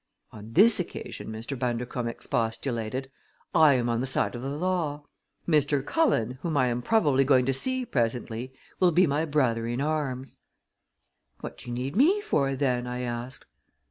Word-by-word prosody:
"On 110 +1 -11
this 210 - +6
occasion," 175 - -6
Mr. 110 +5 -5
Bundercombe 120 -1 -2
expostulated, 115 +3 -3 0.4
"I 150 -3 +6
am 120 -1 0
on 120 0 0
the 130 - -2
side 130 - +1
of 120 - -6
the 135 - -4
law. 150 -2 -2 0.4
Mr. 145 -3 +2
Cullen, 130 - +1
whom 160 -2 -1
I 130 -2 +3
am 120 0 -2
probably 145 - +3
going 130 -2 +4
to 135 - +1
see 260 - 0
presently, 120 - -2 0.3
will 180 -2 +4
be 180 +3 +5
my 150 +1 0
brother 125 -7 +1
in 120 +2 -2
arms." 140 -3 -2 1.0
"What - - -8
do - - -12
you 120 - -4
need 130 +4 -4
me 330 - +4
for, 140 - 0
then?" 125 -3 0
I 125 0 -4
asked. 120 +1 -5
130 Hz, 170 wpm, -27 LUFS, 120-150 Hz, 1.0 s, this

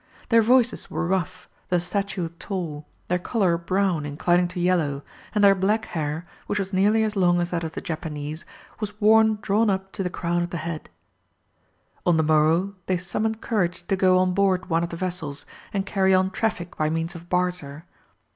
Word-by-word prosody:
Their 230 -1 +6
voices 245 +1 +3
were - - -2
rough, 185 0 -2 0.2
their 180 - +3
stature 190 -1 -2
tall, 165 -7 -5 0.2
their 180 0 +1
colour 185 -3 +1
brown 180 -1 0
inclining 175 +5 +1
to 180 +1 -6
yellow, 165 -6 +1 0.3
and 210 - +3
their 200 -1 +8
black 205 +4 +1
hair, 155 0 -3 0.2
which 205 - -1
was 195 -1 -3
nearly 210 +4 +3
as 215 -1 -1
long 175 -2 +3
as 175 0 -1
that 170 -1 -1
of 160 -1 -4
the - - -5
Japanese, 155 -1 -5 0.4
was 210 -1 -5
worn 220 0 +5
drawn 210 +2 +2
up 190 0 -2
to - - -5
the 180 - -1
crown 175 0 -1
of 175 - -2
the 175 - -4
head. 160 -1 -5 1.1
On 175 -2 +3
the 160 - +3
morrow 160 +5 +3
they 185 - +1
summoned 215 +5 -2
courage 175 -6 -1
to 195 - +1
go 185 -1 +4
on 185 0 +2
board 185 -2 +1
one 165 +1 +3
of 170 - -2
the 170 - -6
vessels 165 -6 -3 0.3
and 195 -1 -1
carry 190 -1 +3
on 185 0 +2
traffic 185 -4 -2
by 155 0 +1
means 165 +2 -2
of 170 0 -11
barter. 180 -4 -2
180 Hz, 195 wpm, -24 LUFS, 170-195 Hz, 1.1 s, their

